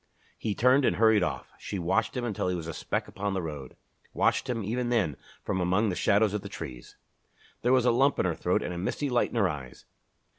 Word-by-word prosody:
He 105 -2 -3
turned 130 +3 +4
and 90 - +3
hurried 110 +1 +5
off. 90 - -3
She 100 - -5
watched 95 +8 0
him 125 - -1
until 105 -5 -2
he 90 - 0
was 85 -2 -5
a 80 - -5
speck - - -2
upon 100 0 -3
the 95 - 0
road; 75 -5 -7 0.4
watched 130 - +1
him, 115 -3 -1
even 120 +4 -1
then, 100 - +1 0.3
from 95 - -1
among 95 +5 +2
the 90 - -2
shadows 105 +1 +3
of 105 - -1
the - - -8
trees. 60 -1 -8 0.7
There 120 - +2
was 130 -2 +4
a 125 - +5
lump 135 +4 +3
in - - +1
her 90 - +1
throat - - 0
and 90 - -3
a 85 - -4
misty 130 +9 -2
light 120 - +2
in - - -9
her 105 -4 +3
eyes. 70 -6 -7
100 Hz, 235 wpm, -28 LUFS, 90-120 Hz, 0.7 s, hurried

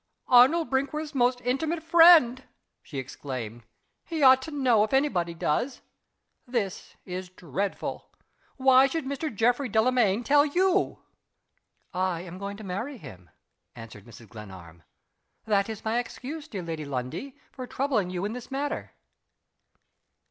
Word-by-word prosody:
"Arnold 270 +7 +5
Brinkworth's 300 +3 -2
most 245 -1 +1
intimate 310 +7 -1
friend!" 325 -7 +6 0.4
she 145 - -9
exclaimed. 125 -3 -6 0.4
"He 320 -3 -3
ought 260 0 +7
to 320 - -7
know 255 -8 +3
if 215 - -3
any 285 +2 +3
body 170 -6 -2
does. 165 - -1 0.7
This 225 -7 -3
is 185 0 -6
dreadful. 185 +2 -5 0.5
Why 265 0 +6
should 320 +1 -3
Mr. 280 +3 -3
Geoffrey 245 +4 +1
Delamayn 220 -1 +2
tell 285 +3 +5
you?" 365 +6 +1 0.9
"I 180 -2 -1
am 180 0 -9
going 200 0 -6
to 215 - -10
marry 210 +9 -5
him," 90 - -13 0.5
answered 110 -3 -11
Mrs. 115 -1 -14
Glenarm. 95 -7 -12 0.6
"That 205 -1 +1
is 220 -1 -7
my 225 +2 +1
excuse, 285 +6 -7
dear 200 - -6
Lady 165 -2 -5
Lundie, 140 - -5 0.2
for 255 -2 -8
troubling 250 -10 -1
you 180 +1 -3
in 210 - -3
this 245 0 -8
matter." 285 +2 -4
240 Hz, 140 wpm, -27 LUFS, 180-275 Hz, 0.9 s, ought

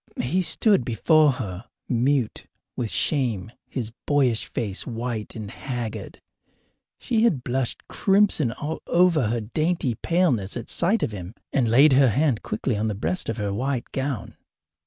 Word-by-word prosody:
He 165 +10 +1
stood 200 - +3
before 145 +6 +3
her 105 -5 -6 0.2
mute 125 0 0 0.3
with 120 -3 -2
shame, 110 - 0 0.2
his 115 -4 -4 0.2
boyish 130 -6 +2
face 105 -7 -3
white 115 -2 -4
and 110 -2 -6
haggard. 120 -4 -5 0.8
She 230 -3 0
had 175 - +2
blushed 125 0 -2
crimson 195 - +2
all 150 +5 -4
over 170 -8 +3
her 115 +1 -1
dainty 155 +3 -1
paleness 125 - +1
at 120 - -5
sight 195 +7 +1
of - - -1
him, 95 +1 -8 0.2
and 130 -5 +2
laid 135 +5 +6
her 135 -1 +5
hand 130 0 +1
quickly 110 +3 -2
on 110 +2 0
the 105 - -2
breast 180 - -2
of 115 - -2
her 100 -2 -2
white 125 +3 -2
gown. 135 -4 -3
125 Hz, 155 wpm, -24 LUFS, 110-150 Hz, 0.8 s, laid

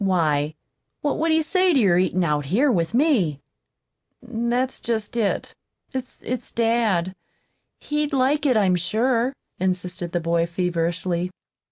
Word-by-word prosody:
Why, 155 -5 +1 0.5
what 290 - -1
would 325 +1 +1
he 320 0 +3
say 370 +2 +2
to 275 - +4
your 185 -6 +4
eatin' 185 0 +1
out 150 -3 0
here 250 - +2
with 170 0 0
me?" 235 - +2 0.8
"That's 245 +2 -2
just 225 0 -2
it. 220 -4 -1 0.4
It's 255 -1 -5
dad. 225 -6 +1 0.6
He'd 295 0 -1
like 280 +2 +2
it, 255 -4 +3
I'm 190 -4 +3
sure," 230 +7 +1 0.3
insisted 180 -1 -2
the 175 - 0
boy 170 0 +1
feverishly. 175 0 -1
210 Hz, 135 wpm, -23 LUFS, 175-255 Hz, 0.8 s, to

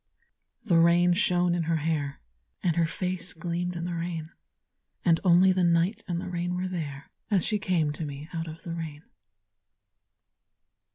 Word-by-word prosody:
The 175 -6 +4
rain 175 +1 +5
shone 180 -2 +2
in 170 -2 0
her 165 - +3
hair, 150 -3 -1 0.4
And 170 -4 +2
her 165 -1 +3
face 180 +1 -3
gleamed 175 +1 -3
in 170 0 -3
the 175 - -3
rain; 165 -1 -4 0.7
And 165 -2 +4
only 185 +1 +6
the 185 -1 +1
night 175 +6 +2
and 175 -2 -1
the - - -5
rain 175 0 -2
were 180 +1 -1
there 150 -6 -5 0.2
As 195 -5 +3
she 210 -2 0
came 170 -6 +1
to 155 - -5
me 145 0 -6
out 165 -1 -3
of 160 +1 -9
the 170 -3 -5
rain. 160 -3 -6
170 Hz, 170 wpm, -28 LUFS, 165-180 Hz, 0.7 s, only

